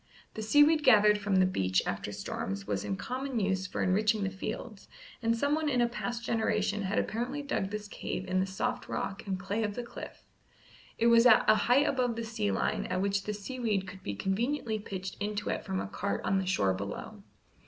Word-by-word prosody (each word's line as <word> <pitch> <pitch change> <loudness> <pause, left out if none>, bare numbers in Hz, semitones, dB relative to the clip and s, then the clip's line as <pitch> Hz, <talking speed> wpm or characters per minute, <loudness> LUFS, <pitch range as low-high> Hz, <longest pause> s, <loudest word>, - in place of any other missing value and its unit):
The 220 - -5
seaweed 295 +7 +5
gathered 210 -4 +6
from 200 -1 0
the 185 0 +5
beach 95 - +1
after - - -3
storms 100 +1 -4
was 100 -2 -2
in 100 -1 -2
common 255 - -3
use 190 -2 0
for - - -2
enriching 210 +3 +2
the 195 - -1
fields, 190 - -6 0.3
and 230 0 +1
someone 300 +4 +1
in 250 -3 +1
a 240 - +4
past 240 0 -4
generation 210 -2 0
had 195 +1 -1
apparently 255 +6 -2
dug 195 -9 -1
this 210 0 -5
cave 190 - -5
in 185 0 +1
the 190 - +1
soft 245 +6 -3
rock 195 - -4
and 190 -1 -2
clay 200 +4 -2
of 210 -2 -2
the 245 - -3
cliff; 235 - -9 0.7
it 230 - +1
was 235 +1 +7
at 225 - +6
a - - +8
height 245 +6 +3
above 250 -5 +1
the 230 - -3
sea 220 -2 -2
line 205 0 0
at 185 0 -1
which 195 0 0
the 210 - -2
seaweed 210 -3 -2
could 190 0 -9
be 100 - -4
conveniently 220 - -1
pitched 190 -2 -6
into 210 0 -2
it - - -3
from 190 -2 -2
a - - -2
cart 200 0 -3
on 195 - +2
the 190 - -3
shore 100 - +2
below. 95 - -6
210 Hz, 210 wpm, -30 LUFS, 190-235 Hz, 0.7 s, a